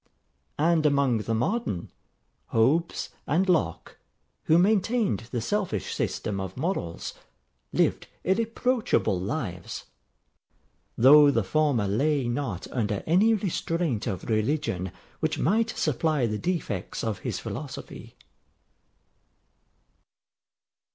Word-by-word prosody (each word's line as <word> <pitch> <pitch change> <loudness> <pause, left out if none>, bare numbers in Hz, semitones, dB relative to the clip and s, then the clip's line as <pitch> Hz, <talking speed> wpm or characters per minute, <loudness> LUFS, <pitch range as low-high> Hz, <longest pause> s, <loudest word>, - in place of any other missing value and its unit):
And 160 +1 +3
among 140 -5 +2
the 115 +1 -1
modern, 125 - -1 0.6
Hobbes 145 +10 +1 0.2
and 170 +7 +2
Locke, 175 -4 0 0.5
who 160 - +5
maintained 200 - +2
the 120 -2 -2
selfish 180 - -2
system 100 -2 -2
of 95 +1 -5
morals, 130 - -3 0.6
lived - - +1 0.2
irreproachable 225 - +1
lives; 95 - -4 1.1
though 145 +4 +8
the 115 -6 +2
former 130 -1 +1
lay 135 +6 +1
not 120 -7 -3
under 105 -5 -1
any 205 +8 +4
restraint 165 - -1
of 95 -5 -3
religion 110 - 0 0.3
which - - 0
might 220 - +2
supply 155 - 0
the 105 -2 -2
defects 165 - -3
of 110 -3 -2
his - - -3
philosophy. - - -7
140 Hz, 100 wpm, -27 LUFS, 110-175 Hz, 1.1 s, though